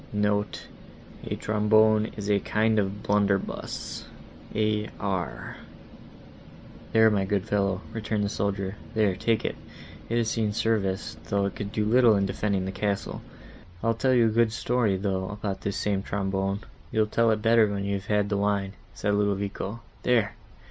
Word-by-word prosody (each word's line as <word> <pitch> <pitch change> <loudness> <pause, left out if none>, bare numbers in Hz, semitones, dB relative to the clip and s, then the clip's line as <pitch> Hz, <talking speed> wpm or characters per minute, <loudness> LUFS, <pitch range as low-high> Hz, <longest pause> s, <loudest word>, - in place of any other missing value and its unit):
(*Note: 105 -1 0 0.6
A - - -2
kind 110 0 +2
of 100 0 -2
blunderbuss. 100 -1 -1 0.5
[A. 105 0 +1
R.]) 90 - -3 1.3
"There, 110 0 +6
my 100 -2 +2
good 95 0 0
fellow," 100 -2 0
returned 110 -2 -1
the - - +1
soldier, 100 -1 -2 0.2
"there, 105 -4 +3
take 110 +3 0
it—it 115 - -6
has 115 -2 +1
seen 110 -2 0
service, 105 -4 0
though 100 0 +1
it 100 - -3
could 100 -1 -5
do 105 -1 0
little 115 0 +5
in 100 -1 +2
defending 100 -1 -1
the 95 - -3
castle. 100 +1 -2 0.6
I'll 115 0 +3
tell 130 +3 +2
you 120 -2 +5
a - - +4
good 115 0 +3
story, 115 -3 +1
though, 95 -1 -1
about 100 -1 -4
this 100 - -2
same 100 -2 0
trombone." 95 0 -1 0.3
"You'll 110 -1 +3
tell 115 +2 +2
it 110 -1 +1
better 115 -1 +5
when 100 -1 -2
you 100 - -1
have 100 0 -4
had 105 -1 +1
the 100 - 0
wine," 100 -1 0 0.2
said 105 0 0
Ludovico. 100 +1 -1 0.2
"There! 115 -3 +2
105 Hz, 155 wpm, -27 LUFS, 100-110 Hz, 1.3 s, There